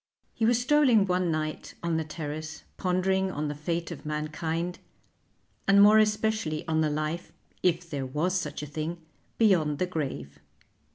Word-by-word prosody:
He 225 - +1
was 240 0 +3
strolling 250 -5 +4
one 180 -1 +1
night 155 -1 -3
on 170 -1 0
the 160 - 0
terrace 155 0 -6
pondering 190 +1 +1
on 150 -4 -3
the - - -2
fate 165 +3 -3
of - - -7
mankind, 160 +3 -3 0.9
and 200 +1 +6
more 210 +2 +8
especially 215 -7 0
on 160 -1 +2
the 155 - +2
life 155 +3 -3 0.3
if 175 -1 +1
there 140 -4 -4
was 155 +7 0
such 150 -5 -2
a - - -3
thing 155 +3 -4 0.4
beyond 170 -10 +3
the 185 - +1
grave. 135 - -4
165 Hz, 160 wpm, -28 LUFS, 155-190 Hz, 0.9 s, more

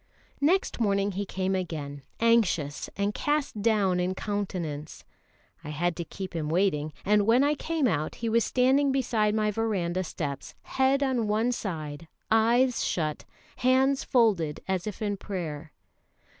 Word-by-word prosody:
Next 345 +3 +2
morning 200 -2 +1
he 200 +1 -4
came 190 +1 -1
again, 155 -6 -4 0.2
anxious 205 -11 +2
and 200 +1 0
cast 290 -7 -1
down 200 -5 +2
in 180 +1 0
countenance. 180 -8 -4 0.6
I 150 - -7
had 170 +3 -1
to 170 - -2
keep 185 +1 -7
him 155 -2 -2
waiting; 155 -4 +1
and 210 0 +3
when 240 +4 +5
I 290 +1 +3
came 315 0 -1
out, 155 -6 -1
he 230 - -4
was 230 0 +3
standing 265 +2 +3
beside 230 -5 +1
my 215 -1 +1
verandah 190 -5 -1
steps, 145 -5 -5
head 265 +1 +2
on 255 -5 0
one 220 +4 +1
side, 160 -8 -5 0.2
eyes 235 +3 +3
shut, 155 -3 -2 0.3
hands 265 +2 +3
folded 195 - +2
as 190 0 -1
if 215 +1 -5
in 205 -1 -1
prayer. 165 -7 -5
200 Hz, 150 wpm, -27 LUFS, 170-235 Hz, 0.6 s, when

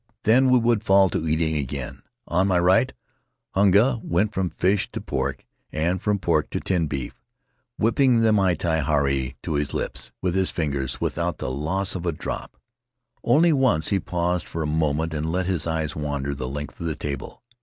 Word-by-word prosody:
Then 130 +4 +5
we 125 - +6
would 115 -2 +2
fall 95 -3 +4
to 80 - -1
eating 80 0 +1
again. 70 -4 -4 0.3
On 90 +3 +2
my 95 -2 +2
right, 95 +9 +3 0.6
Hunga 105 +6 +4
went 100 +6 0
from 95 -3 -1
fish 95 +5 0
to - - -3
pork - - -3 0.3
and 85 +4 -1
from 105 -1 +1
pork 85 -5 0
to - - -2
tinned 85 -5 0
beef, 70 -3 -5 0.6
whipping 115 +2 +3
the 110 -1 +4
miti 85 -5 +1
haari 70 -2 0
to - - -2
his 75 -1 -1
lips - - -4
with 90 -2 -1
his 95 0 +2
fingers 70 -6 -2
without - - -2
the - - -4
loss 90 +8 -1
of 90 -1 -4
a - - +2
drop. 75 - -6 0.7
Only 160 +7 +4
once 130 - +2
he 100 - +2
paused 90 0 -1
for 80 - -3
a - - -2
moment 80 +1 0
and 80 +1 -2
let 90 +1 0
his 85 -4 -1
eyes 80 -2 -2
wander 70 -2 -2
the 65 -2 -5
length 75 +1 -6
of 85 - -3
the 80 - -2
table. 70 - -6
85 Hz, 185 wpm, -24 LUFS, 75-100 Hz, 0.7 s, we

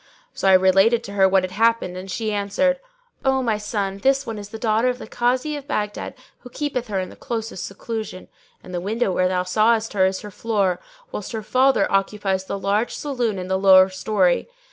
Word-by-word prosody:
"[FN#604] - - -31
So - - +1
I - - +7
related 195 +5 +4
to 200 - -8
her 195 -1 +4
what 190 0 +3
had 185 - -3
happened 225 -2 +1
and 185 +1 -7
she 215 +3 -2
answered, 235 +7 +1 0.4
"O 265 -1 +2
my 220 -3 0
son, 200 -2 -3
this 270 +4 +2
one 225 -2 -5
is 205 0 -9
the 225 - -7
daughter 220 +1 +1
of 250 - -2
the - - -9
Kazi 255 +5 0
of 285 -1 -8
Baghdad 210 -7 -3 0.2
who 250 - -12
keepeth 255 -3 -3
her 200 -3 -2
in 185 - -4
the - - -13
closest 225 -5 -5
seclusion; 215 -1 -6 0.4
and 180 - -11
the 175 - -2
window 210 +2 -1
where 185 0 +2
thou 180 0 0
sawest 220 +4 +2
her 190 -2 +3
is 190 0 -3
her 210 - -9
floor, 195 -4 0 0.3
whilst 210 - -6
her 220 -1 -4
father 260 -1 +3
occupies 195 -1 0
the 200 - -4
large 200 +4 0
saloon 245 -8 -2
in 180 0 -5
the 190 0 0
lower 190 -1 +7
story. 190 - +1
210 Hz, 215 wpm, -22 LUFS, 190-235 Hz, 0.4 s, I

